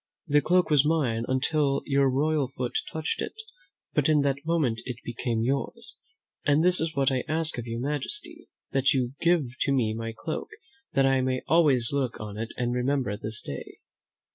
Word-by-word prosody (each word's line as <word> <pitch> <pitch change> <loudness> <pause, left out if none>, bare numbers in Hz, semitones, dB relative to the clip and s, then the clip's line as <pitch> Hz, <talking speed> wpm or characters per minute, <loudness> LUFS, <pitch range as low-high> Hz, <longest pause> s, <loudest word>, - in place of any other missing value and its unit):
The 145 -2 +3
cloak 180 +2 +2
was 145 -3 +6
mine 135 -8 +1
until 140 +1 +1
your 140 -1 +3
royal 145 +1 +1
foot 125 -2 -5 0.2
touched 160 0 -2
it, - - -4 0.6
but - - +2
in 150 -2 +4
that 140 0 0
moment 150 -9 0
it 125 - -4
became 115 -1 -2
yours. 140 - -2 0.4
And 145 +2 +3
this 180 0 +4
is 160 -1 -2
what 135 0 +3
I 130 -1 0
ask 160 -4 -1
of 120 - -6
your 115 0 -3
majesty, 145 +7 -2 0.2
that 135 0 +3
you 125 -2 0
give 170 -2 +4 0.2
to 140 - +1
me 120 -5 +2
my 115 0 -4
cloak 155 +8 -5 0.4
that 135 - +4
I 135 -1 +3
may 130 0 -1
always 145 -8 +4
look 135 -4 -1
on 105 -1 -6
it 115 +2 -4
and 120 -1 0
remember 125 -3 0
this 110 +1 -5
day." 70 - -7
135 Hz, 185 wpm, -27 LUFS, 120-155 Hz, 0.6 s, was